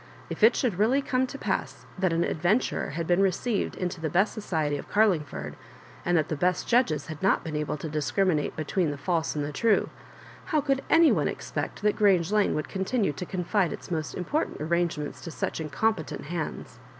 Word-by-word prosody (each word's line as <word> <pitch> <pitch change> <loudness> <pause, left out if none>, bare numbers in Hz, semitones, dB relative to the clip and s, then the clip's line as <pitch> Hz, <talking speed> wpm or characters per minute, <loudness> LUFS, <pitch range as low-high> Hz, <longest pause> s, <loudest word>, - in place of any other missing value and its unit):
If - - -5
it 220 +3 +7
should 220 -8 0
really 255 +7 +3
come 255 0 +1
to 275 - -7
pass - - -3
that 185 -2 +2
an 165 +1 +2
adventurer 180 +11 0
had 170 - -1
been 175 +2 +2
receiv 195 +3 +1
ed - - -11
into 180 -2 -4
the 160 - -1
best 190 +6 +2
sodely 155 -6 -1
of - - -10
Cariiogford, 155 - +1 0.5
and 175 0 +2
that 155 -1 +1
the 155 - -2
best 180 +4 0
judges 230 - +2
had 155 -2 -8
not 195 - +2
been 160 -2 -5
able 150 0 -2
to 155 - -5
discriminate 155 +1 0
between 160 +2 0
the 145 - -4
false 160 +3 -1
and 145 0 -2
true, 225 +2 +2 0.5
how 310 - +1
could 275 -2 0
any 330 -1 +6
one - - +2
expect - - -4
that 210 0 +3
Grange 195 -4 +3
Lane 210 -1 +2
would 155 - -2
continue 195 - 0
to 180 +5 -6
con 180 -2 -3
fide 190 -1 +1
its - - -8
most 155 -2 -2
important 290 - -2
arrangements 165 -2 -1
to - - -7
such 160 - -3
in 155 - -4
competent 180 -1 -1
hands? 165 +1 -5
175 Hz, 205 wpm, -27 LUFS, 155-210 Hz, 0.5 s, it